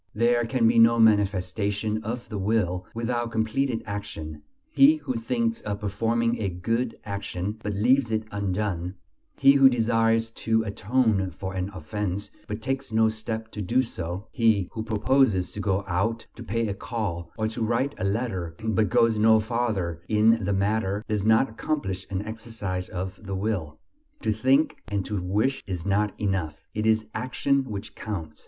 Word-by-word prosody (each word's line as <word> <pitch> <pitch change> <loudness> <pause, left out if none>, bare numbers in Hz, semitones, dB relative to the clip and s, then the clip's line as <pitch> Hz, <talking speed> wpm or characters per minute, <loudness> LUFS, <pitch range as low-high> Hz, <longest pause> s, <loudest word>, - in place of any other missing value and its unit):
There 120 +2 +3
can 115 -1 +2
be 115 0 +4
no 115 +1 +6
manifestation 105 0 +2
of 120 +3 -4
the 105 -3 -5
will 95 -3 0
without 120 0 -1
completed 115 +3 0
action; 100 -8 -6 0.3
he 300 0 +7
who 290 -4 -4
thinks 230 -1 -1
of 100 -1 -4
performing 115 +3 0
a 100 - 0
good 115 +7 -2
action, 100 0 -4
but 105 -1 -3
leaves 120 +3 +3
it 110 0 0
undone; 95 -3 -2 0.4
he 135 0 +7
who 135 -1 +7
desires 115 -1 +2
to 110 0 0
atone 105 -1 +1
for 95 +2 -6
an 95 +1 -2
offense, 100 +2 -4 0.2
but 105 +1 -5
takes 135 +1 -2
no 110 0 +4
step 110 0 -4
to 105 - -5
do 120 +7 +2
so; 90 -2 -5
he 110 -6 +2
who 110 - -4
proposes 110 -2 +2
to - - -7
go 100 -1 0
out, 110 +6 -1
to - - -11
pay 115 0 -1
a 100 - -1
call, 100 -6 -4
or 110 -1 0
to 115 +1 -6
write 120 +5 +1
a - - -2
letter, 100 -5 -2
but 110 -1 +1
goes 115 -2 +3
no 110 0 +6
farther 110 -7 -1
in 110 +1 +4
the 100 - 0
matter, 100 +1 0
does 105 -1 -1
not 110 +4 +5
accomplish 105 -6 -3
an 95 +1 -2
exercise 110 -4 -5
of 95 +1 -5
the 100 -1 -4
will. 95 -7 -2 0.4
To - - +1
think 130 +8 +2
and 100 -3 -2
to 105 -3 -2
wish 105 +9 0
is 90 -3 -4
not 100 +1 0
enough. 95 -7 -2
It 105 +1 -1
is 110 0 +3
action 135 +2 0
which 105 -5 -6
counts. 85 -8 -6
110 Hz, 170 wpm, -26 LUFS, 100-115 Hz, 0.4 s, he